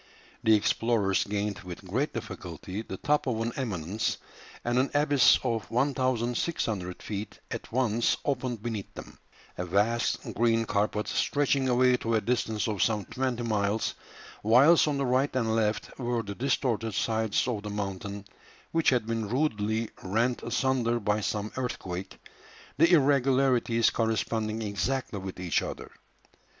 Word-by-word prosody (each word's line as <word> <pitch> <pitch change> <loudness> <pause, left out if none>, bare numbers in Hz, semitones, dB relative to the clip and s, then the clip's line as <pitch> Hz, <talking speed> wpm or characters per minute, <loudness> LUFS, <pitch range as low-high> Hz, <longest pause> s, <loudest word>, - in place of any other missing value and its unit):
The 110 -1 +5
explorers 105 -2 +1
gained 105 0 -2
with 90 +1 -9
great 130 +11 0
difficulty 95 -3 -6
the 95 -4 -7
top 150 +4 +1
of 115 -3 0
an 115 +1 -2
eminence, 105 - -2 0.5
and 120 +1 +2
an 135 - +2
abyss 145 -3 +5
of 115 -5 -2
1600 120 - -1
feet 105 0 -5
at - - -6
once 120 -2 +1
opened 125 -5 -2
beneath 110 -4 -4
them; - - -10 0.4
a - - 0
vast 105 +6 +1 0.2
green 115 -1 +2
carpet 105 0 0
stretching 140 -2 +1
away 125 0 +4
to 115 -1 -1
a 110 - +2
distance 110 -3 0
of 105 -4 -2
some 105 -3 +1
twenty 125 -2 -2
miles, 105 -1 0 0.5
whilst 135 +10 +6
on 145 -2 0
the 140 - 0
right 130 +2 +1
and 115 -3 +1
left 110 -1 -1
were 120 -2 -1
the 100 -1 -5
distorted 115 -3 -1
sides 110 -1 +1
of 115 -5 -2
the 105 - -6
mountain, 100 0 -4 0.5
which 165 -1 +3
had 125 -4 +1
been 115 -2 -2
rudely 110 -4 0
rent 115 +6 0
asunder 120 -1 +1
by 105 0 0
some 105 +1 -2
earthquake, 95 -7 -4 0.6
the 165 +4 +5
irregularities 135 -5 +3
corresponding 110 0 -1
exactly 105 +2 -2
with 95 -1 -7
each 90 -2 +1
other. - - -6
115 Hz, 145 wpm, -28 LUFS, 105-125 Hz, 0.6 s, whilst